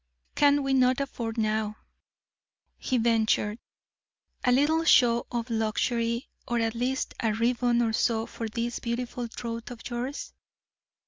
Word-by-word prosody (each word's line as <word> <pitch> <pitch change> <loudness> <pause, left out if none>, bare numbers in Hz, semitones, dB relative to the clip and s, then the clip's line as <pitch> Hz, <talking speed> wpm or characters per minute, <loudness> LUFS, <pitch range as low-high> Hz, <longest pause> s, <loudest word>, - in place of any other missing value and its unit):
'Can 285 -1 +4
we 270 0 0
not 255 0 +4
afford 235 -4 -4
now,' 215 -1 0 1.0
he 260 - 0
ventured, 225 -2 +2 0.8
'a 250 - +3
little 295 +6 +3
show 240 -7 +4
of 235 0 -3
luxury, 230 +2 0 0.2
or 240 - 0
at 225 -1 0
least 250 +3 -2
a 220 -3 0
ribbon 240 +1 +2
or 225 -1 0
so 225 0 +1
for 230 - -5
this 235 +2 -3
beautiful 240 0 -3
throat 230 0 -6
of 245 -2 -8
yours?' 250 +4 -4
235 Hz, 135 wpm, -27 LUFS, 225-250 Hz, 1.0 s, Can